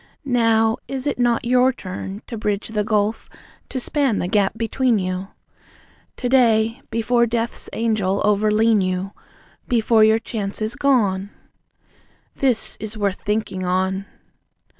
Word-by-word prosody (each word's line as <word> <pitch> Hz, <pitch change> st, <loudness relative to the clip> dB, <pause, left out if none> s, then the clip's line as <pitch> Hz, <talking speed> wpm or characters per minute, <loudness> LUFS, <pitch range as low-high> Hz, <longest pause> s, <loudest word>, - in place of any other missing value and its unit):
Now, 225 Hz, -3 st, +2 dB
is 270 Hz, -1 st, -4 dB
it 290 Hz, -, -1 dB
not 240 Hz, -1 st, +1 dB
your 250 Hz, +1 st, +4 dB
turn 190 Hz, -2 st, -7 dB
To 235 Hz, -, -7 dB
bridge 210 Hz, -1 st, -2 dB
the 210 Hz, -1 st, -1 dB
gulf, 215 Hz, +1 st, 0 dB, 0.4 s
to 260 Hz, -, -3 dB
span 270 Hz, -4 st, 0 dB
the -, -, -1 dB
gap 195 Hz, 0 st, +2 dB
be 225 Hz, -, -1 dB
tween 255 Hz, -1 st, +2 dB
you? 185 Hz, 0 st, -3 dB, 0.9 s
To 250 Hz, -, -2 dB
day, 230 Hz, -1 st, +3 dB
before 235 Hz, +1 st, +2 dB
Death's 230 Hz, 0 st, -2 dB
angel 215 Hz, -4 st, 0 dB
over 210 Hz, +1 st, +2 dB
lean 220 Hz, 0 st, +3 dB
you, 185 Hz, +1 st, -2 dB, 0.6 s
Before 225 Hz, -2 st, +3 dB
your 220 Hz, +1 st, +5 dB
chance 210 Hz, -3 st, -4 dB
is 215 Hz, +1 st, -2 dB
gone? 205 Hz, -8 st, +1 dB, 1.1 s
This 255 Hz, -5 st, 0 dB
is 215 Hz, 0 st, -7 dB
worth 200 Hz, -2 st, -1 dB
thinking 210 Hz, -3 st, -2 dB
on. 190 Hz, +2 st, -1 dB
220 Hz, 140 wpm, -21 LUFS, 200-235 Hz, 1.1 s, your